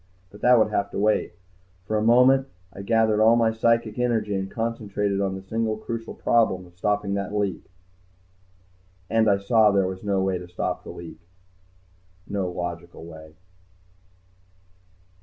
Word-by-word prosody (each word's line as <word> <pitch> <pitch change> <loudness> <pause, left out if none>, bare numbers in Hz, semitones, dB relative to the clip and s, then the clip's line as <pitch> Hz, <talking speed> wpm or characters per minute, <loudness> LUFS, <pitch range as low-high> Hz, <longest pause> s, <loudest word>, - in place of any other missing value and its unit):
But 105 - -14
that 125 0 +6
would 110 -1 +2
have 100 - 0
to - - -6
wait. 105 -2 +1 0.5
For 110 - -2
a 105 - +1
moment 125 +4 +5 0.3
I 100 - -8
gathered 110 0 +2
all 110 +1 +6
my 115 -1 +3
psychic 115 0 0
energy 115 -4 0
and 95 0 -3
concentrated 105 -3 -2
on 95 -1 -1
the 95 - -8
single 110 +2 -2
crucial 115 +1 -6
problem 100 -6 +1
of 90 0 -19
stopping 100 +2 -1
that 100 0 -3
leak. 100 -3 -2 1.4
And 110 -1 +3
I 100 - +4
saw 105 +2 +4
that 100 - +1
there 95 -1 +3
was 95 +1 -6
no 100 -2 0
way 95 -1 -1
to 90 - -10
stop 90 - -4
the - - -11
leak. 85 -2 -10 1.1
No 100 -2 -2
logical 85 -1 -6
way. 80 -1 -12
105 Hz, 160 wpm, -24 LUFS, 95-115 Hz, 1.4 s, that